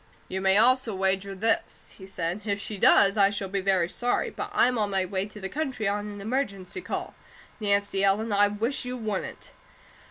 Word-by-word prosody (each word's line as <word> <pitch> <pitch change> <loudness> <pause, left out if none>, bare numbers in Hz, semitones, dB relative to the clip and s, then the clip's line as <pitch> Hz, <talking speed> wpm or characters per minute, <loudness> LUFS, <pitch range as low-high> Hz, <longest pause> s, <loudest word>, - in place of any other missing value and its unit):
"You 190 +1 -4
may 190 +1 +4
also 245 -1 +3
wager 195 +1 0
this," 225 +4 -1
he 190 - -10
said. 180 +1 -3
"If 200 -2 -1
she 205 0 -6
does, 200 +2 +5
I 200 -1 +5
shall 200 -1 -4
be 195 0 -1
very 185 -3 +2
sorry, 245 +7 -1
but - - -5
I'm 250 -1 +2
on 210 -1 0
my 190 -1 0
way 190 +1 -2
to 210 0 -12
the 190 - -4
country 265 -4 -3
on 205 +1 -1
an 205 -1 -8
emergency 215 - -3
call. - - -5 0.5
Nancy 200 -2 0
Ellen, 205 +3 +2
I 205 0 +5
wish 225 +7 -2
you 250 0 -5
wouldn't!" 215 -5 -5
200 Hz, 195 wpm, -26 LUFS, 195-220 Hz, 0.5 s, does